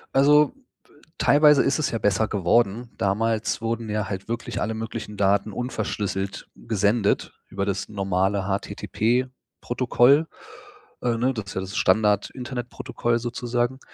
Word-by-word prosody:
Also, 150 - +5 0.6
teilweise 150 -1 +5
ist 140 - +1
es 155 - 0
ja 115 - -1
besser 105 +2 +2
geworden. 110 +4 +1
Damals 110 +2 0
wurden 115 -1 -3
ja 105 -1 -2
halt 95 -1 -5
wirklich 115 +1 -4
alle 110 +1 -1
möglichen 110 -2 -6
Daten 100 +1 +2
unverschlüsselt 105 -4 -3
gesendet, 105 0 0 0.2
über 100 - -2
das 100 -1 -3
normale 95 -1 0
HTTP-Protokoll. 125 +6 0 0.7
Äh, 120 -2 0
ne, 130 +3 +1
das 110 -4 -5
ist - - -7
ja 95 - -1
das 95 +3 -6
Standard-Internetprotokoll 115 +4 0
sozusagen. 120 +1 -2
115 Hz, 125 wpm, -24 LUFS, 100-120 Hz, 0.7 s, Also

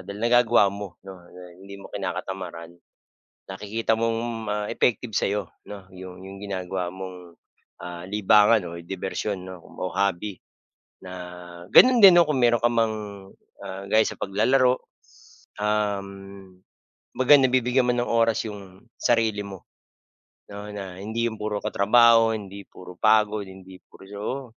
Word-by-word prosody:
dahil 100 +1 -7
nagagawa 120 -3 +4
mo 100 -3 -8
'no, 95 -2 -10 0.4
hindi 100 0 -11
mo - - -10
kinakatamaran. 95 -3 -6 0.8
Nakikita 105 +4 -2
mong 115 0 0 0.3
ma 105 - -1 0.2
effective 120 -1 0
sa'yo 100 -1 0 0.2
'no, 100 -3 -10
yung, 95 0 -10
yung 95 0 -10
ginagawa 95 -2 -4
mong, 90 -2 -10 0.4
ah, 90 -1 -7
libangan 105 +1 +4
o - - -7
dibersyon 95 +2 -4
o 90 -2 -10
kumbaga 95 - -6
hobby 100 +1 -1 0.7
na 90 - -9 0.6
gano'n 250 -1 +7
din 190 -3 +10
'no, 170 - +7
kung 145 - 0
mayro'n 120 -1 +3
ka 120 - +6
mang, 115 -2 +1 0.7
ah, 95 +1 -7
gaya 110 +1 +4
sa - - -8
paglalaro, 125 +6 +2 0.2
s - - -24
um, 100 -2 -3 0.6
kumbaga 130 +3 +5
na 130 -1 +3
bibigyan 125 0 +2
mo 125 - +3
ng 120 0 -1
oras 115 -1 +2
yung 100 +1 -12
sarili 110 -3 +1
mo 95 -2 -10 0.9
'no. 100 +1 -8
Na 95 -3 -7
hindi 110 +3 -2
yung 110 - -7
puro 105 -1 -3
katrabaho, 115 +2 +4
hindi 100 -1 -9
puro 90 0 -12
pagod, 110 -1 +2
hindi 95 -1 -13
puros 95 +1 -15
oo. 120 +2 -6
105 Hz, 145 wpm, -24 LUFS, 95-115 Hz, 0.9 s, din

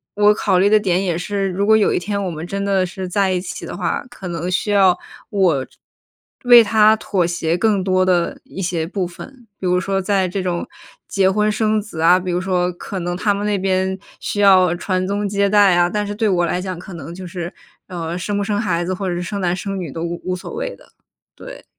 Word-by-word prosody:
我 210 - +1
我 210 - +7
考 185 -3 +1
虑 195 - +4
的 215 - +6
点 190 -3 +1
也 175 -4 -1
是， 195 +2 -2
如 195 +2 -1
果 220 0 +5
有 210 - +2
一 - - +1
天 200 +2 -3
我 190 - -2
们 160 0 -6
真 200 +2 -3
的 190 -2 +2
是 185 +1 -6
在 190 +1 +1
一 180 - 0
起 180 - -7
的 - - -7
话， 175 -3 -2
可 195 -6 -9
能 175 +1 -3
需 205 +3 0
要 190 -3 +4 0.3
我 175 -10 +1 0.8
为 240 -1 +9
他 215 0 +5
妥 190 -4 0
协 170 0 -1
更 205 -2 +1
多 185 -1 +2
的 175 -2 +1
一 195 - -8
些 170 -3 -1
部 185 0 -3
分， 245 +7 -12
比 190 - -5
如 180 0 +2
说 195 +1 -1
在 190 -1 +1
这 185 +1 -3
种 175 -1 -2 0.4
结 190 -1 +2
婚 210 +2 +1
生 215 0 +1
子 170 -6 -7
啊， 175 +3 +6
比 185 -1 -4
如 175 - 0
说 180 -1 0
可 190 +2 -6
能 175 +1 -3
他 205 +1 +1
们 200 +1 -3
那 205 -1 +1
边 190 0 0 0.2
需 205 - -2
要 185 -3 +5
传 185 +1 -1
宗 205 +1 -1
接 200 0 +1
代 205 -3 +5
啊。 175 0 +3
但 210 +1 -1
是 205 - -4
对 215 0 0
我 175 -2 +2
来 180 +2 -1
讲 185 -2 -5
可 180 +1 -10
能 165 0 -8
就 185 - -8
是， 175 0 -5 0.4
呃， 170 -2 -4
生 200 +3 -2
不 200 - 0
生 205 0 -1
孩 175 -5 -1
子 185 - -2
或 190 0 -3
者 175 - -2
是 175 - -3
生 200 +2 -4
男 180 -1 +1
生 195 0 -4
女 170 -6 -5
都 165 +4 -5
无 170 0 -4
无 185 0 -2
所 180 - -8
谓 - - -4
的， - - -21 0.4
对。 - - -11
190 Hz, 265 characters per minute, -19 LUFS, 175-205 Hz, 0.8 s, 为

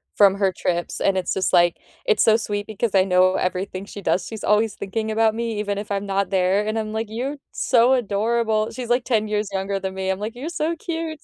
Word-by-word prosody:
from 200 -2 +6
her 195 -2 +1
trips, 175 -1 -2
and 195 -1 +2
it's 180 -2 -1
just, 190 - 0
like, 175 0 +5 0.3
it's 450 -3 +3
so 220 -1 +5
sweet 205 -2 -3
because 215 0 -2
I 190 - +6
know 185 0 +3
everything 185 +1 -2
she 205 - -9
does, 185 -1 0
she's 220 -2 -7
always 210 +1 +2
thinking 220 +3 -3
about 220 0 +2
me 230 -2 -2
even 205 -1 -2
if 205 0 -6
I'm 200 0 -1
not 195 0 0
there, 190 +2 +2
and 215 +1 -1
I'm, 215 -1 -4
like, 220 0 -2
"You're 255 +6 -3 0.2
so 245 +1 +3
adorable." 220 -1 0
She's 250 -2 -6
like 245 +1 +2
10 220 -4 +1
years 210 -1 -1
younger 195 +1 -1
than 190 -1 -4
me, 190 0 -3
I'm, 190 0 -1
like, 215 +2 -4
"You're 275 +6 -5
so 330 0 -1
cute." 325 -1 -4
210 Hz, 235 wpm, -22 LUFS, 195-230 Hz, 0.3 s, from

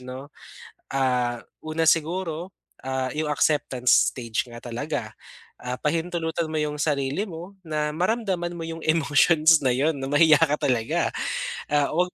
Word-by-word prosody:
'no. 130 +3 -9 0.6
Ah, 125 -3 0 0.2
una 155 +1 -2
siguro, 165 +2 0 0.3
ah, 130 -1 -1
yung 155 +4 -2
acceptance 145 -4 +1 0.2
stage 115 -3 -3
nga 120 -1 -11
talaga, 120 0 -4 0.5
ah, 125 0 -6
pahintulutan 165 +1 -1
mo 155 -1 -2
yung 150 0 -2
sarili 145 +4 0
mo 180 +1 -9
na 150 -1 -1
maramdaman 180 +1 -1
mo 170 - -7
yung 165 0 -6
emotions 155 0 +4
na 125 - +3
yun 145 +4 +1
na 135 - -4
mahiya 150 +2 +5
ka 150 -2 +1
talaga, 120 -4 +1 0.6
ah, 145 -1 +3
'wag 180 +3 0
150 Hz, 145 wpm, -25 LUFS, 135-165 Hz, 0.6 s, mahiya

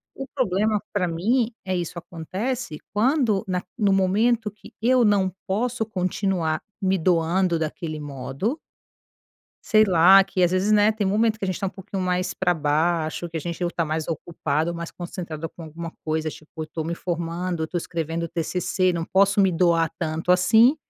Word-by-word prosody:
O 270 - -5
problema, 215 -4 +1
pra 190 -3 +1
mim, 220 +9 +1
é 185 -1 -1
isso 175 0 -3
acontece 185 +4 -4 0.2
quando 230 -2 +2
naq 180 -1 -2
no 205 -4 +3
momento 210 +4 +2
que 210 - -16
eu 250 +1 +4
não 200 -3 +3 0.2
posso 225 +4 -1
continuar 185 -5 -1 0.2
me 190 0 +2
doando 170 0 +2
daquele 155 0 -4
modo 145 - -3 1.1
sei 215 -1 +5
lá, 190 0 +7
que 190 -1 -2
às 175 - +4
vezes, 185 +3 +1
né, 210 +1 +5
tem 215 -2 -1
momento 220 +2 +2
que 205 - -3
a - - -1
gente 185 -2 -2
tá 195 - -1
um - - -2
pouquinho 190 0 -5
mais 180 0 0
pra 180 -1 +1
baixo, 160 +2 0
que 165 - -6
a - - -1
gente 170 +2 -5
ou 175 - 0
tá 170 - -1
mais 155 0 -2
ocupado, 160 0 -2
mais 170 0 -5
concentrado 170 -3 -6
com 165 - -12
alguma 165 +2 -7
coisa. 155 0 -1
Tipo, 155 +1 -9
"eu - - -5
tô 160 0 -5
me 170 +2 -2
formando, 170 0 -3
eu 160 - -2
tô 180 - -4
escrevendo 165 -1 -3
TCC, 180 +3 0
não 170 -1 -2
posso 200 +3 +3
me 195 -1 +4
doar 165 -2 +2
tanto 160 +1 -2
assim". 220 +10 +5
180 Hz, 185 wpm, -24 LUFS, 165-200 Hz, 1.1 s, lá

